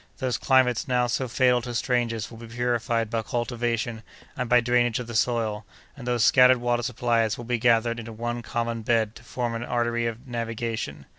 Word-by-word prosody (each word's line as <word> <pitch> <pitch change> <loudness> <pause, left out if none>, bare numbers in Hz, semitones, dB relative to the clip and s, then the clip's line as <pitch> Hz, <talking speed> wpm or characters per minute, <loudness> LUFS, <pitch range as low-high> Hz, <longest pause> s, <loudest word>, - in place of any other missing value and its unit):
Those 125 -5 -1
climates 130 -1 +3
now 125 -1 +2
so 125 +2 -1
fatal 125 +1 +3
to 120 0 -6
strangers 120 -3 -1
will 115 - -11
be 115 - -9
purified 120 -1 -1
by 115 -1 0
cultivation 120 -1 -2 0.3
and 125 -2 -3
by 125 0 +6
drainage 120 -1 +2
of 125 - -4
the 115 - -8
soil, 110 -2 0 0.3
and 130 -4 -9
those 120 -2 +1
scattered 130 -1 +6
water 120 0 0
supplies 115 -2 0
will 120 - -8
be 120 0 -1
gathered 115 0 +2
into 115 0 -7
one 120 +2 -4
common 115 0 -3
bed 110 -1 +1
to 115 - -16
form 120 -1 -3
an 115 +1 -3
artery 120 -1 0
of 115 +3 -6
navigation. 115 - -4
120 Hz, 195 wpm, -25 LUFS, 115-120 Hz, 0.3 s, by